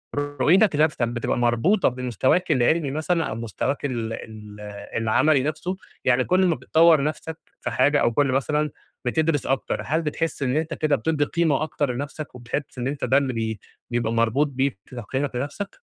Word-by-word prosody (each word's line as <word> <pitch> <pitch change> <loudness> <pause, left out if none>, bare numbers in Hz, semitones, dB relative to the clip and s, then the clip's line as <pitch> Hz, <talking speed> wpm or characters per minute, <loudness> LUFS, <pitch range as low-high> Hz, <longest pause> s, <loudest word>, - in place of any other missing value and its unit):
رؤيتك 145 +7 +3
لنفسك 150 -2 +2
بتبقى 120 0 -2
مربوطة 120 - +3
بمستواك 125 - 0
العلمي 140 +4 +2
مثلًا، 160 +3 0
أو - - -4
مستواك 115 +5 -3
ال 115 -4 -2
ال 105 -2 -9 0.4
العملي 130 +6 +3
نفسه؟ 155 +5 -2 0.3
يعني 125 +1 +4
كل 185 +1 +3
ما 170 - +2
بتطوّر 160 -2 +4
نفسك 155 +2 -3 0.2
في - - -3
حاجة 145 +3 +3
أو 120 - +3
كُلّ 140 +1 +2
مثلًا 150 +3 +1 0.4
بتدرس 155 +3 +1
أكتر، 135 0 -1
هل 160 +2 +1
بتحس 160 -1 -2
إن 130 +2 +1
أنت 160 +1 -1
كده 155 -3 +1
بتدّي 145 +5 0
قيمة 155 -2 +1
أكتر 145 -4 -1
لنفسك، 145 +2 -6
وبتحس 125 +3 -5
إن 125 0 -2
أنت 140 +1 -2
ده 135 - +4
اللي 135 -2 0
بي 110 -2 -2 0.3
بيبقى 120 -2 0
مربوط 115 +6 +2
بيك 135 -4 -1
تقييمك 130 +3 -3
لنفسك؟ 145 - -5
140 Hz, 170 wpm, -24 LUFS, 120-155 Hz, 0.4 s, يعني